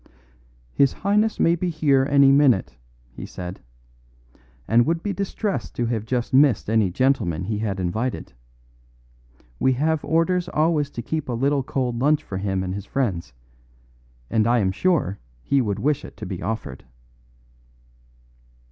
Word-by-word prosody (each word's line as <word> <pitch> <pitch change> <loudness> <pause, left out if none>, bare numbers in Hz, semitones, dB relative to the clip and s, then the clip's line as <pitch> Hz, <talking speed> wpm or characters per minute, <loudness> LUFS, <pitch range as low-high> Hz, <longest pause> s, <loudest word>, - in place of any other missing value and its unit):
"His 140 -1 +3
Highness 210 +3 +1
may 165 - +4
be 180 +1 -2
here 140 -5 +2
any 140 -1 +6
minute," 130 - +3 0.4
he - - -9
said, 90 0 -7 1.1
"and 115 +2 +4
would 165 0 0
be 205 - -2
distressed 200 +1 -3
to 120 - -1
have 115 -2 -2
just 125 +1 -2
missed 130 -6 +4
any 110 -4 +3
gentleman 90 - 0
he 105 +2 -3
had 100 -3 -2
invited. 110 +8 -3 1.3
We 130 - +3
have 155 +4 0
orders 175 +3 +1
always 155 -2 +1
to 120 - -7
keep 155 +1 -3
a - - -1
little 140 +4 +1
cold 125 -2 -2
lunch 150 +3 +2
for 95 - -5
him 95 -1 -1
and 95 0 -3
his 100 0 -6
friends, 100 - -2 0.9
and 110 - +1
I 120 +1 +3
am 95 -5 +1
sure 125 - 0 0.2
he 140 - +2
would 105 -5 -1
wish 150 +7 0
it - - -11
to - - -7
be 95 -3 -6
offered." 100 - -5
130 Hz, 155 wpm, -23 LUFS, 105-150 Hz, 1.3 s, any